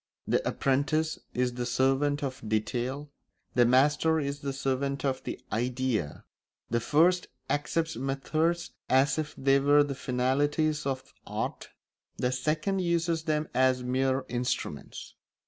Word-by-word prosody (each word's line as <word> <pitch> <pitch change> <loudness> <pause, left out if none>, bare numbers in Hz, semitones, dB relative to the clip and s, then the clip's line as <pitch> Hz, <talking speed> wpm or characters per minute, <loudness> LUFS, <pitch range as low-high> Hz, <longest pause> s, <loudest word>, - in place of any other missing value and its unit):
The - - +2
apprentice 150 +4 0 0.2
is 125 0 +1
the 120 0 -3
servant 135 +4 +1
of 130 -2 -4
detail; 125 +7 -2 0.4
the 120 -1 +5
master 150 +5 +4
is 140 -1 -3
the 140 -1 -3
servant 135 0 -1
of 130 -1 -1
the - - -4
idea: 120 - -1 0.5
the 120 - +2
first 170 +8 +3 0.2
accepts 160 +2 0
methods 155 +6 -1 0.2
as 135 +3 +3
if 155 -1 -4
they 135 +1 +4
were 145 +1 +5
the 145 -1 -3
finalities 145 +4 0
of 130 -1 -4
art; - - -4 0.5
the 125 - 0
second 155 +9 0
uses 170 -2 0
them 155 -1 0
as 130 -1 +3
mere 130 +1 0
instruments. 125 +1 -4
135 Hz, 130 wpm, -29 LUFS, 130-150 Hz, 0.5 s, the